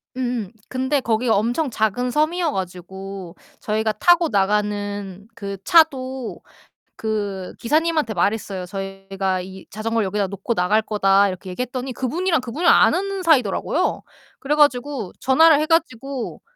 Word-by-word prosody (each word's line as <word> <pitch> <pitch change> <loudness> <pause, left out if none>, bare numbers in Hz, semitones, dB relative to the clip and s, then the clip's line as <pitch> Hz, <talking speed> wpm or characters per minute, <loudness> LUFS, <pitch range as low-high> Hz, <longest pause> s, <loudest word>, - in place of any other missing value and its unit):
음음. 240 -6 -2 0.2
근데 260 +2 0
거기가 230 0 +1
엄청 240 +9 0
작은 225 +2 0
섬이어 315 +3 +1
가지고 190 -1 -6 0.2
저희가 220 +1 0
타고 340 +8 +4
나가는 205 -1 -1
그 200 -2 -6
차도 265 -6 +2 0.5
그 205 -4 -3
기사님한테 310 -1 +1
말했어요. 195 -1 -1
"저희가 195 0 -3
이 190 +1 -10
자전거를 225 +1 -1
여기다 200 +1 -1
놓고 200 +4 -3
나갈 210 +3 +2
거다." 200 -2 +3
이렇게 185 0 -7
얘기했더니 250 +5 -4
그분이랑 325 +8 0
그분이랑 295 +9 +2
아는 390 0 +2
사이더라고요. 265 - +1 0.4
그래 280 +2 -1
가지고 270 -6 +1
전화를 300 +3 +5
해 305 - +1
가지고 275 -6 -1
220 Hz, 330 characters per minute, -21 LUFS, 195-275 Hz, 0.5 s, 전화를